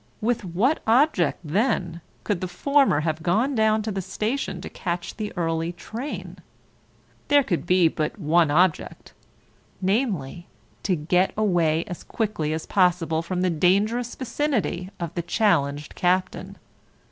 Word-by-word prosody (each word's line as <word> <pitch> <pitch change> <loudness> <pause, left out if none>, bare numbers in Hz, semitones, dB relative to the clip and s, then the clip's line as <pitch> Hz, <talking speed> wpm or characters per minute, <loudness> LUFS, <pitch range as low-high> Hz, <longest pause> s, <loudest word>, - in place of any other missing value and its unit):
With 230 0 0
what 195 - +1
object 235 - +3
then 175 - 0 0.2
could 205 -5 -1
the 185 - -2
former 275 - +2
have 155 0 -2
gone 215 - +1
down 220 -2 +2
to 215 - -3
the 195 -1 -2
station 215 +1 -3
to - - -7
catch 175 -1 -4
the 215 -1 -4
early 165 0 -1
train? 230 +10 -7 0.9
There 290 -1 +5
could 175 -7 -2
be 180 -2 +5
but 155 +3 -2
one 165 -2 +3
object, 175 +2 0 0.7
namely 185 - -1 0.3
to 190 - +1
get 180 +4 +1
away 170 -6 +2
as 180 -4 -8
quickly 210 -9 -2
as 160 0 -3
possible 170 -4 +2
from 180 +2 -3
the 185 -1 +2
dangerous 205 +9 +1
vicinity 250 -9 -2
of 170 -1 -4
the 175 - -2
challenged 155 -6 0
Captain. 185 +1 -1
180 Hz, 140 wpm, -24 LUFS, 170-220 Hz, 0.9 s, There